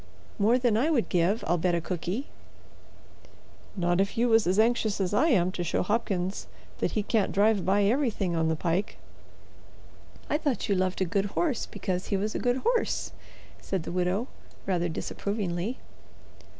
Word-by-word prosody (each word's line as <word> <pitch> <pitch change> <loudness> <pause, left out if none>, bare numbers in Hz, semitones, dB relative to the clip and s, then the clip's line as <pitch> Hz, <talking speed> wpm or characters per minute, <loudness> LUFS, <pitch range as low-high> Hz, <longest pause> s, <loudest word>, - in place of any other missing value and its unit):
"More 220 +5 +4
than 240 -4 +2
I 275 +8 +2
would 275 -8 +1
give, 185 +5 +1
I'll 175 +1 +1
bet 175 +1 +1
a - - +1
cookie." 180 - -3 1.5
"Not 175 0 +2
if 200 +2 -2
you 240 +1 +3
was 225 -4 +4
as 185 +2 +2
anxious 220 -2 +2
as 190 0 -1
I 295 +10 +4
am 185 - +3
to 175 - -3
show 170 - 0
Hopkins 190 - -1 0.3
that - - -1
he 215 - 0
can't 215 -1 +1
drive 205 -1 +3
by 200 +2 +3
everything 210 -6 +1
on 160 -1 +1
the 160 - +1
pike." 175 +5 -1 1.3
"I 300 - 0
thought 285 - -1
you 200 - +2
loved 185 0 0
a - - +3
good 195 +3 0
horse 295 -9 0
because 185 -2 -3
he 200 - 0
was 210 +3 -2
a - - -2
good 245 0 +1
horse," 480 0 0 0.5
said 190 -4 -3
the - - -6
widow, 180 +6 0 0.4
rather 175 -2 0
disapprovingly. 200 +4 -3
200 Hz, 175 wpm, -28 LUFS, 180-225 Hz, 1.5 s, More